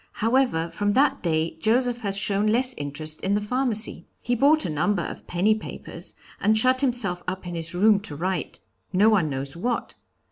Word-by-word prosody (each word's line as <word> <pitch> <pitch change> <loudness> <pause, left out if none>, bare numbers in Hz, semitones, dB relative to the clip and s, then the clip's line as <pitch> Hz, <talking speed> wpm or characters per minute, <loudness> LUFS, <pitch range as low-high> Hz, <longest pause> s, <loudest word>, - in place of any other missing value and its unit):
However, 225 -8 0
from 205 0 -1
that 275 +5 +2
day 160 -1 0
Joseph 240 +5 +1
has 200 -3 0
shown 200 +1 +1
less 250 +4 +3
interest 155 0 -3
in 195 +2 0
the - - +1
pharmacy. 230 0 -1
He 245 - -2
bought 290 +6 +3
a - - -2
number 170 +5 0
of - - -8
penny 190 +5 +2
papers, 215 - -7 0.2
and 215 +2 +2
shut 255 +4 +4
himself 235 -10 +1
up 185 0 -4
in 175 - -6
his 165 0 0
room 205 +2 +4
to 195 -8 -7
write 175 -5 -3 0.3
no 200 +4 +4
one 190 -8 +2
knows 135 0 -4
what. 235 +7 -3
205 Hz, 185 wpm, -24 LUFS, 170-240 Hz, 0.3 s, shut